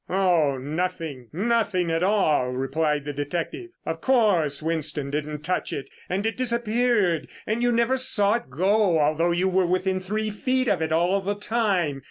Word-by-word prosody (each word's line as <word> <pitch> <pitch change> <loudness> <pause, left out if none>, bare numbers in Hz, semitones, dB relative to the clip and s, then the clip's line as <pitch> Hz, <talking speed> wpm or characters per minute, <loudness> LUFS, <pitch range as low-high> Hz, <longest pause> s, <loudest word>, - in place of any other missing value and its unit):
"Oh 175 -7 +2
nothing, 150 -3 -4
nothing 195 -2 0
at 165 0 0
all," 180 -10 +2
replied 145 +3 -1
the 145 - -4
detective. 170 - -4 0.2
"Of - - -4
course 200 - +2
Winston 155 -3 -1
didn't 150 0 -4
touch 180 +3 -1
it 135 -1 -6 0.2
and 195 +3 -1
it 225 - -1
disappeared 235 -7 +1 0.2
and 220 +2 -1
you 245 0 +2
never 235 +2 +2
saw 210 -6 +3
it 235 - -3
go, 190 +5 +2
although 155 +3 +2
you 175 +2 +1
were 185 -1 +2
within 185 +1 0
three 215 +3 -2
feet 255 +4 0
of 180 -7 +1
it 160 0 -1
all 175 +5 +2
the 200 +2 -2
time. 200 -9 0
185 Hz, 170 wpm, -24 LUFS, 155-215 Hz, 0.2 s, saw